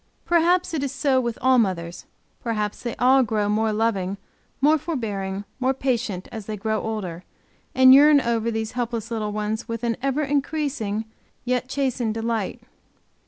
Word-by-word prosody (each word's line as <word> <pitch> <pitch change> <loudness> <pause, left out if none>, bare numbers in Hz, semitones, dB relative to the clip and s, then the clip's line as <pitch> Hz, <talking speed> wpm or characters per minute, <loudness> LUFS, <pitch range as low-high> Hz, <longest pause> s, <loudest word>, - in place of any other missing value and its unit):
Perhaps 345 +1 +2
it 310 - -1
is 275 - -2
so 270 -1 +1
with 235 -2 -3
all 260 -1 +5
mothers, 175 -5 -2 0.3
perhaps 210 -3 -2
they 235 - -4
all 260 +2 +5
grow 215 -4 0
more 215 +1 +1
loving, 205 -3 0 0.4
more 300 +3 +4
forbearing, 205 - -3 0.2
more 260 +1 +1
patient 235 -8 -2
as 220 -4 -7
they 215 -1 -4
grow 220 +1 -1
older, 185 -6 -4 0.5
and 260 0 +8
yearn 290 +1 +7
over 235 -3 0
these 220 -1 -3
helpless 235 -2 -3
little 215 -2 -2
ones 215 +1 -3
with 230 0 -5
an 230 -1 0
ever 275 +3 0
increasing, 280 -7 -1 0.4
yet 250 0 -1
chastened 255 -5 -1
delight. 225 0 -2
230 Hz, 160 wpm, -23 LUFS, 215-265 Hz, 0.5 s, and